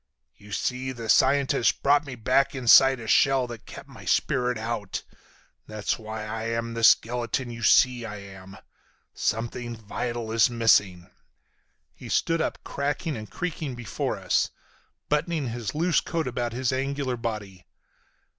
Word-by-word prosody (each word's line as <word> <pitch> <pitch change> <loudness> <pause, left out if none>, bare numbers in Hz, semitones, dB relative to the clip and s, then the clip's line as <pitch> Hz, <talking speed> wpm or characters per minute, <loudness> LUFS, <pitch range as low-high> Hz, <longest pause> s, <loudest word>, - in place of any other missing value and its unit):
You 105 +1 -16
see, 125 +5 -2
the 115 -2 -7
scientist 135 0 +3
brought 145 +1 +3
me 130 - -6
back 130 +4 +1
inside 130 +1 +6
a 115 - -8
shell 135 +3 +3
that 120 -2 -10
kept - - -10
my - - -13
spirit 125 -1 +1
out. 110 -3 -4 0.6
That's 110 +1 -2
why 110 0 -6
I'm 115 +1 -3
the 115 0 -4
skeleton 120 +2 +3
you 115 0 -8
see 125 +2 +4
I 110 -2 -6
am. 95 -1 -11 0.6
Something 120 +2 -2
vital 115 +2 -4
is 115 0 +4
missing." 100 -6 +2 0.8
He - - -11
stood 165 0 +1
up - - -2
cracking 145 +3 -2
and 110 -2 -8
creaking 155 - -4
before 120 -3 -3
us, - - +1 0.6
buttoning 150 -2 0
his 115 -2 -5
loose 170 +2 +2
coat 165 -2 -2
about 120 -1 -2
his 130 +1 -1
angular 135 -1 -2
body. 105 -6 -6
120 Hz, 145 wpm, -26 LUFS, 110-135 Hz, 0.8 s, inside